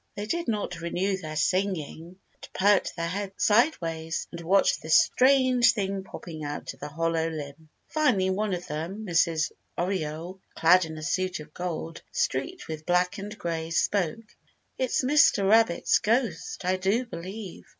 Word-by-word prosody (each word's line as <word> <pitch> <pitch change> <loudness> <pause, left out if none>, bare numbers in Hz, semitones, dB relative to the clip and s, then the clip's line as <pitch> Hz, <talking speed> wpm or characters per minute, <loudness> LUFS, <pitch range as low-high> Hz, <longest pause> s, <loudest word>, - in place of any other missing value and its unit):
They 205 - -4
did 340 +10 -2
not 205 -6 -2
renew 180 +3 -1
their 155 -4 -7
singing, 180 -1 -1 0.2
but - - -14
perked 200 +1 +3
their 170 -1 -2
heads 195 +2 -3
sideways 165 - +1
and 170 - -7
watched 190 +4 +3
this 160 +1 +5
strange 255 -2 +4
thing 195 -3 -2
popping 165 -4 -8
out 145 0 -5
of - - -21
the 145 - -5
hollow 165 +2 -1
limb. 155 0 -8 0.2
Finally 235 -12 +2
one 200 0 0
of 175 - -7
them, 170 +8 -5
Mrs. 165 -3 +1 0.3
Oriole, 175 0 -3
clad 180 +2 +5
in 160 -1 -8
a 155 - -7
suit 185 +2 -1
of 150 0 -12
gold, 165 -2 -5
streaked 365 -1 -2
with 155 -1 -7
black 180 +3 +1
and 205 +2 -7
gray, 165 -1 -3
spoke. 200 +5 -1 0.4
"It's 260 0 0
Mr. 255 -7 +4
Rabbit's 220 -4 +4
ghost, 230 -4 -1
I 185 +1 +2
do 200 +7 +1
believe. 190 0 -8
185 Hz, 160 wpm, -27 LUFS, 165-205 Hz, 0.4 s, this